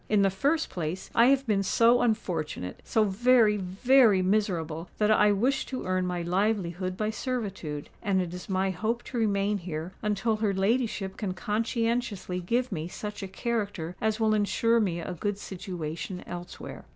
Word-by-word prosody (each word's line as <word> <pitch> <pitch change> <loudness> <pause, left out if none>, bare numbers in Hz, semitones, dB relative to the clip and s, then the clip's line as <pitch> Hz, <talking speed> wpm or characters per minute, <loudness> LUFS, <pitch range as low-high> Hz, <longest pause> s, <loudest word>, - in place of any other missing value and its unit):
"In 210 -2 +4
the 195 - +3
first 290 - 0
place, 175 +1 -4
I 235 +1 +6
have 275 0 +3
been 210 -4 +2
so 230 +5 +4
unfortunate—so 180 - -1
very, 215 +1 +4
very 205 +2 +4
miserable, 175 -5 0
that 210 0 +3
I 210 -1 +5
wish 250 +7 +1
to 260 - -5
earn 185 0 0
my 175 -1 -2
livelihood 185 -1 -1
by 215 0 0
servitude; 200 - -4
and 195 -2 +1
it 180 -2 -2
is 180 +1 -8
my 190 0 +1
hope 225 +6 -2
to 245 - -4
remain 205 -1 +1
here 165 -1 -5
until 210 +1 0
her 210 -2 0
ladyship 200 -1 0
can 190 -4 -3
conscientiously 225 -2 -1
give 235 +8 0
me 160 -3 -3
such 210 +3 -6
a 195 - -4
character 200 -4 -3
as 220 0 0
will 220 -1 +3
ensure 230 +2 +2
me 180 -6 0
a 175 +2 -4
good 200 +4 -2
situation 180 -1 -6
elsewhere." 175 0 -8
200 Hz, 165 wpm, -28 LUFS, 180-225 Hz, -, I